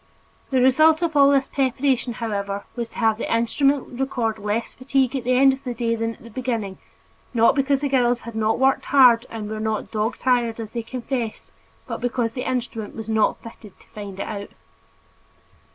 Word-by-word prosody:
The 260 -2 +2
result 310 +5 +5
of 325 -2 -1
all 280 -1 +6
this 275 -1 +3
preparation, 260 -2 0
however, 200 -3 -3
was 235 -1 -4
to - - -15
have 220 -1 +2
the - - -3
instrument 255 +3 +1
record 235 -5 -1
less 210 +3 -2
fatigue 265 0 0
at 255 -3 -3
the 255 0 +2
end 270 +1 +6
of 265 +1 -9
the 250 -3 -4
day 230 0 0
than 225 0 -2
at - - -20
the 230 - -12
beginning, 225 -5 -3 0.6
not 230 0 +5
because 275 -1 +1
the 290 - 0
girls 245 -3 +2
had 235 - -8
not 220 0 +1
worked 265 +1 +2
hard 250 -4 +5
and 220 -2 -6
were 215 0 -5
not 215 -1 -2
"dog 220 +2 -1
tired" 240 -3 +1
as 220 -2 -6
they 235 - -3
confessed, 240 -1 -5 0.3
but - - -6
because 240 -2 -1
the 250 0 -3
instrument 230 -4 -4
was 225 -1 -7
not 220 -1 +1
fitted 225 -3 -13
to - - -22
find 200 -2 -8
it - - -1
out. 200 -1 -6
235 Hz, 200 wpm, -23 LUFS, 220-265 Hz, 0.6 s, all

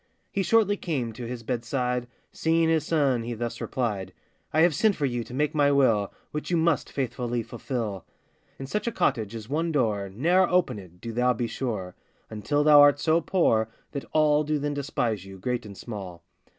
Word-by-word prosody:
He 200 - 0
shortly 205 +1 +3
came 130 -12 -3
to 120 +1 -7
his 120 -1 -6
bedside; 125 +1 -2 0.2
Seeing 165 0 +2
his 160 -2 +1
son, 140 -7 +2
he 120 +1 -4
thus 115 +1 -4
replied: 100 -7 -2 0.4
'I 155 - +3
have 170 -1 +5
sent 205 +7 +3
for 145 - -1
you 120 -3 -1
to - - -13
make 150 +1 0
my 145 -2 +3
will, 115 -8 +3 0.2
Which 150 - -4
you 175 - +2
must 165 -1 +1
faithfully 120 -3 -2
fulfil. 110 -5 -4 0.5
'In 135 - -6
such 210 - -3
a - - +1
cottage 110 - 0
is 110 -1 -7
one 160 +5 -1
door, 110 -9 0
Ne'er 175 - +2
open 180 - +1
it, 90 -2 -15
do 115 - -5
thou 125 +2 +2
be 120 +1 -2
sure, 110 -6 -4 0.4
Until 145 +7 0
thou 150 -1 +8
art 145 0 +6
so 165 +2 +2
poor, 115 - +2 0.2
that 140 - -5
all 150 -1 +3
Do 150 0 0
then 145 0 -2
despise 130 - -2
you, 95 0 -11
great 120 +3 -3
and 100 -2 -10
small. 95 -7 -8
125 Hz, 195 wpm, -26 LUFS, 115-150 Hz, 0.5 s, thou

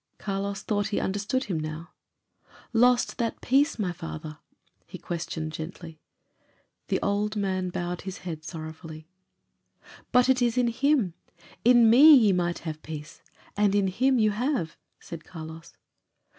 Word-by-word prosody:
Carlos 200 0 -4
thought 205 -2 -1
he 205 - -1
understood 205 +7 -1
him 180 -9 -3
now. 155 +2 -6 0.8
"Lost 245 +1 +3
that 230 -1 -2
peace, 280 +5 +2
my 195 -5 -1
father?" 150 - -8 0.5
he - - -9
questioned 160 -2 -5
gently. 160 0 -8 0.9
The - - 0
old 210 +1 0
man 190 -3 -1
bowed 175 0 -4
his 190 0 -7
head 160 -3 -5
sorrowfully. 160 -1 -9 1.0
"But 250 0 +4
it 260 -1 +3
is 240 0 +1
in 245 -1 +3
Him. 255 - +1 0.5
'In 240 -1 +6
me 285 +7 +9
ye 220 -7 +5
might 175 -1 -1
have 155 -1 -5
peace.' 155 +1 -9 0.3
And 205 -1 +2
Him 205 +7 +2
you 215 -2 +3
have," 230 - -2 0.2
said 165 -2 -9
Carlos. 160 0 -10
195 Hz, 140 wpm, -26 LUFS, 165-235 Hz, 1.0 s, me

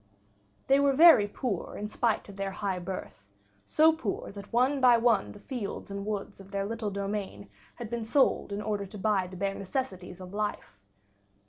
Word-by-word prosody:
They 275 +1 +4
were 280 -1 +4
very 310 -8 +8
poor 205 -2 -4
in 210 - -4
spite 225 +1 0
of 200 - -11
their 195 0 -2
high 195 -1 -3
birth, 175 - -7 0.4
so 320 +1 +5
poor 250 -11 -4
that 200 0 -10
one 260 +4 +2
by 245 -2 +7
one 230 -4 +2
the 205 - -12
fields 210 -3 -6
and 200 +1 -5
woods 205 -2 -4
of 195 0 -13
their 200 -1 -1
little 225 0 -3
domain 200 - -4 0.2
had 235 -2 -7
been 235 -1 -2
sold 265 -2 +2
in 205 +1 -3
order 205 -2 -2
to 205 - -10
buy 195 -2 +1
the 185 0 -10
bare 195 +1 -1
necessities 190 -4 -4
of 185 0 -10
life. 205 - -3
205 Hz, 190 wpm, -29 LUFS, 195-235 Hz, 0.4 s, very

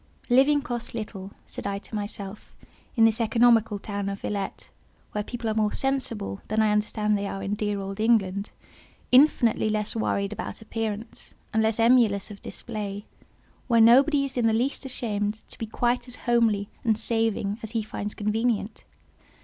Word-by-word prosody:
"Living 275 +3 +5
costs 240 -5 -4
little," 205 -4 -6 0.2
said - - -6
I 200 0 -2
to 200 - -13
myself, 205 -1 -5 0.4
"in 225 -2 +6
this 225 +1 +2
economical 225 -1 +4
town 200 -1 -4
of 200 0 -5
Villette, 200 -2 -4 0.4
where 210 - -2
people 235 +1 -5
are 220 - +1
more 215 -1 +1
sensible 235 - -2
than 215 +1 0
I 215 -1 +4
understand 210 0 +1
they 200 0 -2
are 195 0 -5
in 200 +1 -2
dear 210 -1 -1
old 195 +1 -6
England—infinitely 220 +4 +1
less 210 0 -1
worried 200 -2 -1
about - - -6
appearance, 220 0 -5 0.2
and 220 - +3
less 220 0 +1
emulous 225 -4 +4
of 200 - -11
display—where 210 +2 -5
nobody 275 +5 +6
is 265 -2 -5
in 235 -2 +3
the 220 - +3
least 255 +5 -1
ashamed 215 -4 -2
to - - -10
be 225 - -3
quite 240 +2 0
as 245 - -6
homely 230 -4 +2 0.2
and 220 -2 +2
saving 225 -2 -1
as 220 - -6
he 225 -2 0
finds 210 -1 -5
convenient. 220 0 -1
220 Hz, 165 wpm, -26 LUFS, 205-235 Hz, 0.4 s, in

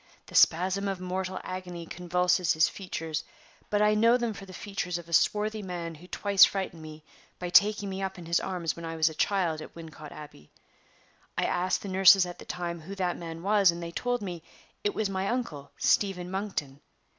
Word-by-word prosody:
The - - -15
spasm 190 +4 +4
of 195 -2 -2
mortal 185 +1 -3
agony 180 -2 -6
convulses 180 0 +1
his 155 0 +4
features; 160 -5 -4 0.5
but 210 0 +2
I 210 0 +4
know 230 +3 +5
them 235 -3 -2
for 195 -1 -10
the - - -10
features 185 -3 -4
of 170 -1 -9
a 170 - -9
swarthy 215 +5 +2
man 175 -3 -5
who 165 +3 -14
twice 200 0 +4
frightened 190 -4 +1
me 155 0 -10 0.3
by 180 -1 -5
taking 205 +1 +5
me 190 0 -4
up 190 -1 -3
in 175 - -9
his 170 +1 +2
arms 175 -4 -2
when 170 - -9
I 165 0 -4
was 160 0 +3
a - - -8
child 170 -3 0
at - - -11
Wincot 155 -2 -10
Abbey. 145 - -12 0.9
I - - +1
asked 180 +1 0
the - - -5
nurses 190 0 +7
at 175 0 -8
the - - -10
time 170 -1 -4
who 190 +5 -8
that 180 -2 -1
man 165 -1 -7
was, 200 -1 +4
and 170 0 -1
they 170 - -5
told 245 +4 -2
me 175 -4 -5 0.4
it 205 - 0
was 220 - 0
my 195 0 -2
uncle, 175 - -3
Stephen 185 -3 +1
Monkton. 185 -8 -4
180 Hz, 205 wpm, -28 LUFS, 170-195 Hz, 0.9 s, nurses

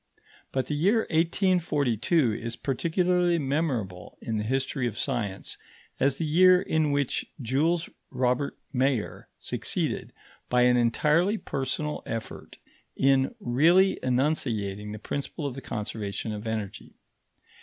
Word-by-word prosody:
But 130 -1 0
the - - -3
year 195 +10 +3
1842 160 - +2
is 115 +1 -4
particularly 175 +6 +1
memorable 135 - -2
in 110 -1 -3
the 105 - -1
history 130 +1 -1
of 110 -2 -5
science 110 -8 -3 0.4
as 135 0 +2
the 165 - -1
year 180 +4 +6
in 160 -4 +1
which 140 -2 0 0.2
Jules 150 +7 +1 0.2
Robert 125 +2 0 0.2
Mayer 130 -3 0
succeeded, - - -2 0.4
by 125 0 +4
an 125 0 +5
entirely 150 - +2
personal 145 -1 -3
effort, 115 -1 -6 0.4
in 135 - +3
really 175 - +4
enunciating 115 -7 -1
the 105 - -5
principle 140 +7 -4
of 140 - -2
the 135 - -8
conservation 105 -2 -4
of 105 +2 -6
energy. 110 -2 -5
135 Hz, 125 wpm, -27 LUFS, 115-160 Hz, 0.4 s, year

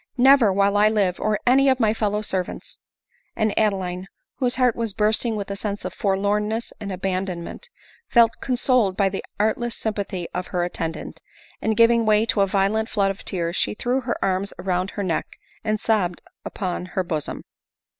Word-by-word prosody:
" - - -40
Never 250 -8 +5
while 200 +1 +2
I 210 +1 +5
live, 200 -5 +1
or 215 -1 0
any 270 +2 +5
of 260 -1 +2
my 220 -3 +3
fellow 210 -1 -1
servants/' 185 -3 -4 0.6
And 215 -1 0
Adeline, 190 -3 0 0.3
whose 250 -2 +1
heart 250 -3 +3
was 230 -4 -3
bursting 220 +2 +2
with 200 -1 -4
a - - -2
sense 205 0 -4
of - - -4
forlorn 205 +1 0
ness 225 +2 -3
and 205 -2 -5
abandonment, 185 - -4 0.4
felt 230 -2 +4
consoled 250 -6 +2
by 195 -2 +3
the 195 - -5 0.2
artless 235 +3 0
sympathy 200 -5 -3
of 180 0 -3
her 180 -2 -1
attendant; 165 -2 -4 0.4
and, 220 -1 0
giving 230 0 +5
way 215 0 +3
to 220 -3 +1
a 195 - +3
violent 200 +3 +1
flood 195 -3 +1
of 195 - -9
tears, 170 -2 -2
she - - +1
threw 250 +4 0
her 240 -1 -2
arms 195 +1 -1
round 180 0 -1
her 205 - -4
neck, 170 -4 -2 0.3
and 215 -1 0
sobbed 200 -6 0 0.2
upon 180 -2 -4
her 185 - +3
bosom. 155 -4 -4
205 Hz, 185 wpm, -23 LUFS, 190-225 Hz, 0.6 s, Never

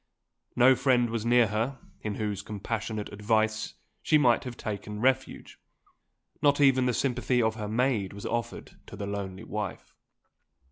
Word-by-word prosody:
No 125 +2 +7
friend 120 -3 +2
was 115 0 -2
near 120 0 +5
her, 115 +5 -1 0.2
in 105 -2 -3
whose 105 -3 -3
compassionate 105 +1 -4
advice 110 +1 0 0.3
she 155 - +4
might 125 -5 +3
have 125 -2 -6
token 105 -1 -5
refuge. 130 +2 -1 0.8
Not 145 -1 +3
even 130 -3 +4
the 125 - +1
sympathy 125 -1 0
of 110 -2 +2
her 110 -2 -5
maid 110 -3 0
was 100 0 -9
offered 120 0 -4
to - - -9
the 100 - -5
lonely 100 0 -5
wife. 105 -3 -5
110 Hz, 150 wpm, -28 LUFS, 105-125 Hz, 0.8 s, No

